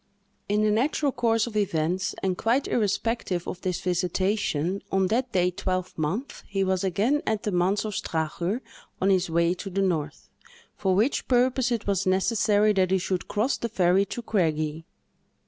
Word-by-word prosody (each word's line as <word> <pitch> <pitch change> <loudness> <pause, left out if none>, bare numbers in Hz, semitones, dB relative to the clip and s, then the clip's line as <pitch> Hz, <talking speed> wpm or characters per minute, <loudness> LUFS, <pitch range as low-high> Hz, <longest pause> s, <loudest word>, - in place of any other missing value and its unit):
In 210 +1 +2
the 215 - +3
natural 275 +6 +1
course 230 -3 +1
of 235 -3 -8
events, 180 -2 0
and 190 -1 +1
quite 235 +8 +1
irrespective 210 -4 -1
of 180 - -5
this 180 -2 -2
visitation, 185 -1 0
on 190 0 +2
that 245 +3 0
day 180 -2 +2
twelvemonth 185 - -3
he 195 -1 0
was 190 -1 0
again 210 +10 +1
at 220 0 0
the 210 - -1
Manse 185 +4 +1
of 215 - -3
Strachur, 170 +7 -2 0.4
on 195 +1 +3
his 185 -2 +2
way 170 +1 +2
to 195 +2 -7
the 195 +1 0
north, 160 -5 -2 0.5
for 190 -2 +1
which 225 +8 +1
purpose 250 0 +2
it 230 -3 -1
was 195 -2 0
necessary 210 +2 +3
that 190 -2 +2
he 190 - +3
should 185 -1 -2
cross 220 +6 0
the 235 - -3
ferry 190 -2 +3
to 240 - -6
Craigie. 160 -6 -1
195 Hz, 170 wpm, -26 LUFS, 180-220 Hz, 0.5 s, the